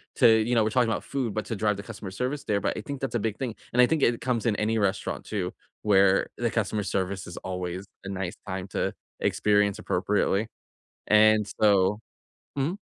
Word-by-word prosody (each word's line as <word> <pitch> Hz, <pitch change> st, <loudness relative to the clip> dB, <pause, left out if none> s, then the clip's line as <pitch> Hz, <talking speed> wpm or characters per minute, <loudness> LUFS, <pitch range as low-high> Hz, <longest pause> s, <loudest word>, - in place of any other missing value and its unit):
to -, -, +6 dB
you 110 Hz, +2 st, +3 dB
know, 115 Hz, -, +4 dB
we're 110 Hz, -, +1 dB
talking 120 Hz, 0 st, +2 dB
'bout -, -, -1 dB
food, 130 Hz, -6 st, -2 dB
but 110 Hz, 0 st, -2 dB
to 115 Hz, -, -3 dB
drive 105 Hz, +1 st, +1 dB
the 100 Hz, -, -7 dB
customer 105 Hz, -2 st, -8 dB
service 125 Hz, +8 st, -3 dB
there, 100 Hz, -1 st, 0 dB
but -, -, -1 dB
I -, -, -3 dB
think 140 Hz, -2 st, -6 dB
that's 135 Hz, -3 st, -2 dB
a -, -, +2 dB
big 110 Hz, -1 st, -2 dB
thing, 125 Hz, -5 st, -3 dB, 0.2 s
and 125 Hz, -, +5 dB
I -, -, +8 dB
think 155 Hz, +2 st, 0 dB
it 120 Hz, -2 st, +2 dB
comes 125 Hz, -3 st, -1 dB
in 110 Hz, -, +2 dB
any 110 Hz, +2 st, 0 dB
restaurant 100 Hz, -2 st, -1 dB
too, 95 Hz, -4 st, -3 dB, 0.3 s
where 100 Hz, -2 st, +4 dB
the 120 Hz, -1 st, 0 dB
customer 105 Hz, -2 st, -1 dB
service 95 Hz, 0 st, -2 dB
is 85 Hz, -, -8 dB
always 90 Hz, 0 st, -4 dB, 0.2 s
a 95 Hz, -, -4 dB
nice 95 Hz, -2 st, -3 dB
time 95 Hz, 0 st, -4 dB
to -, -, -1 dB, 0.3 s
experience 105 Hz, -1 st, +2 dB
appropriately, 100 Hz, +2 st, 0 dB, 0.6 s
and 110 Hz, 0 st, +5 dB, 0.2 s
so 100 Hz, -1 st, +4 dB, 0.6 s
Mhm. 150 Hz, +8 st, 0 dB
105 Hz, 210 wpm, -27 LUFS, 95-115 Hz, 0.6 s, I